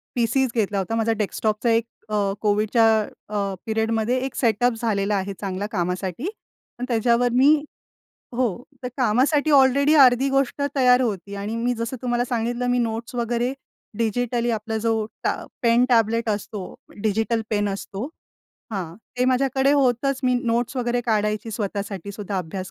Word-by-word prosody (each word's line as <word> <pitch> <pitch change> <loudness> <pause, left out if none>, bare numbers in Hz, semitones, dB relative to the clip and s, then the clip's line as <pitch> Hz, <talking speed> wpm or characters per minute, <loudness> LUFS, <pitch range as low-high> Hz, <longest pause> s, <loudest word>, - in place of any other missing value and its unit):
पीसीच 250 +2 +1
घेतला 205 -2 0
होता. 195 +4 -2
माझा 225 0 +1
डेस्कटॉपचा 215 +2 -1
एक 230 0 +3 0.2
अ, 215 - -1 0.3
COVIDच्या 215 +2 +3 0.4
अ, 200 -2 -1
पिरियडमध्ये 225 +2 0
एक 270 - -6
सेट 230 -2 +1
अप 245 - +3
झालेला 205 -2 0
आहे 195 0 -2
चांगला 195 0 -3
कामासाठी. 185 - -2 0.5
पण 250 - -3
त्याच्यावर 235 +1 +2
मी 275 +5 +6 0.8
हो, 255 - +2 0.4
तर 250 - -3
कामासाठी 270 +5 +2
ऑलरेडी 280 +1 +5
अर्धी 260 +1 +6
गोष्ट 275 +1 0 0.2
तयार 250 -1 +5
होती 200 -5 -2
आणि 205 +3 -4
मी 240 +2 0
जसं 230 +3 -4
तुम्हाला 245 0 0
सांगितलं 240 +1 -1
मी 245 - +2
नोट्स 230 0 -2
वगैरे 240 +1 0 0.5
डिजिटली 235 +1 0
आपला 220 0 -2
जो 225 +1 +1 0.3
टा - - +3 0.3
पेन 235 +1 +4
टॅबलेट 230 -1 +2
असतो, 210 0 -3 0.4
डिजिटल 225 +2 +1
पेन 205 -1 +1
असतो 195 +2 -5 0.7
हां, 180 -5 -4 0.2
ते 250 - +3
माझ्याकडे 265 +1 +2
होतच 270 -1 +2
मी 250 -1 +2
नोट्स 240 +1 0
वगैरे 245 0 0
काढायची 215 0 0
स्वतःसाठीसुद्धा 200 -1 -4
अभ्यास 185 +2 -5
230 Hz, 150 wpm, -23 LUFS, 210-250 Hz, 0.8 s, मी